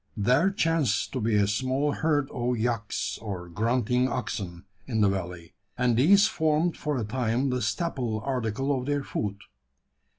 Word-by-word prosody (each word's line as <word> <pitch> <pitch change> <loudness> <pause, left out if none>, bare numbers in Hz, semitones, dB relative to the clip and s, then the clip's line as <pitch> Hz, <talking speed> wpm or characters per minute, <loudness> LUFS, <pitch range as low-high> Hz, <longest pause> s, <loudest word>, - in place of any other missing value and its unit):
There 125 - +3
chanced 165 - 0
to 130 - -1
be 110 0 +1
a 100 -1 +4
small 130 +8 0
herd 145 -2 +1
of 120 0 -1
"yaks," 115 -1 -2
or 95 -5 -5
grunting 120 +6 +1
oxen, 95 -9 -4 0.2
in 110 -4 0
the 100 - +5
valley; 90 -3 -5 0.2
and 125 -1 +2
these 195 - +6
formed 160 +2 +1
for 150 -2 -2
a 120 - -1
time 125 +3 0
the 125 0 -1
staple 125 -12 -1
article 130 +2 -1
of 130 0 -4
their 145 -1 0
food. 100 -6 -3
125 Hz, 160 wpm, -27 LUFS, 105-140 Hz, 0.2 s, these